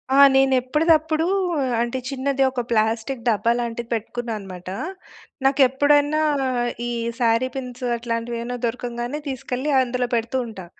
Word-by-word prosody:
ఆ! - - +4 0.2
నేను 270 0 +4
ఎప్పుడిదప్పుడూ 315 +4 +2 0.5
అంటే 240 +2 -1
చిన్నది 275 0 0
ఒక 255 -1 -2
ప్లాస్టిక్ 225 +3 0
డబ్బా 230 0 +2
లాంటిది 235 0 -4
పెట్టుకున్నా 230 +1 -3
అనమాట. 185 -2 -9 0.8
నాకు 270 +1 +3
ఎప్పుడన్నా 290 +3 +3 0.7
ఈ - - -2 0.3
శారీ 235 +1 +2
పిన్స్ 255 -1 -6
అట్లాంటివి 230 0 -3
ఏవన్నా 245 +1 -4
దొరకంగానే 240 +3 -3
తీసుకెళ్ళి 260 +1 -3
అందులో 250 -1 -1
పెడుతూ 235 +3 -1
ఉంటా. 195 -5 -9
245 Hz, 130 wpm, -22 LUFS, 230-270 Hz, 0.8 s, ఆ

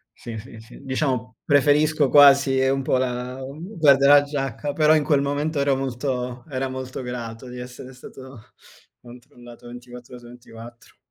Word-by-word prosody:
Sì, 115 -2 -9
sì, 115 -1 -13
sì. 115 +2 -15
Diciamo 130 -5 -3
preferisco 145 0 +2
quasi 140 -2 +6
un 135 0 0
po' 130 - 0
la 125 0 -3
mhmm, 155 +10 -9
guarda, 140 -3 +5
la 145 0 +7
giacca, 140 0 -4
però 155 0 +4
in 150 - +1
quel 145 -2 +2
momento 145 +2 -2
era 140 -1 +1
molto 125 -2 -4
era 135 0 -3
molto 130 0 -7
grato 120 0 -7
di 125 0 -9
essere 125 +1 -10
stato 130 -1 -13 0.6
controllato 120 0 -15
24 125 0 -12
ore 125 - -10
su 120 - -15
24. 120 -1 -14
130 Hz, 160 wpm, -22 LUFS, 125-140 Hz, 0.6 s, la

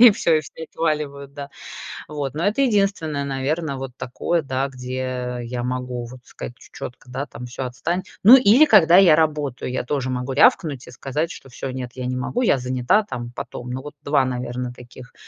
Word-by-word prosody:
и 240 -1 +11
всё, 170 -5 +2
и - - +2
все 155 +2 -11
отваливают, 145 -3 -2
да. 140 -1 -7 0.6
Вот. 145 -2 -4
Но 155 +3 -3
это 220 +7 +2
единственное, 195 - +1
наверное, 140 +3 -2
вот 135 -1 -6
такое, 165 +7 -1
да, 135 -1 -1
где 125 -1 -4
я 120 +1 -4
могу, 125 -1 -3
вот, 125 0 -12
сказать 120 - -9
ч - - -17
чётко, 125 +1 -8
да, 135 +3 -3
там: 125 - -9
"Всё 125 +2 -5
отстань". 130 +9 -2 0.2
Ну 230 +6 +11
или 255 +5 +6
когда 180 - +7
я 180 -5 +8
работаю, 150 -6 0
я 130 - -2
тоже 130 0 -2
могу 125 +1 -2
рявкнуть 140 -1 +3
и - - -10
сказать, 140 +6 -2
что 135 - -10
всё, 125 +2 -6
нет, 125 -1 -5
я 130 -1 -4
не 125 - -2
могу, 130 - -2
я 220 - +4
занята 125 - +2
там, 120 - -5
потом. 125 - -6
Ну 130 +1 -4
вот 150 +1 -8
2, 140 -2 +2
наверное, 125 0 -3
таких, 125 0 -13
135 Hz, 200 wpm, -22 LUFS, 125-155 Hz, 0.6 s, и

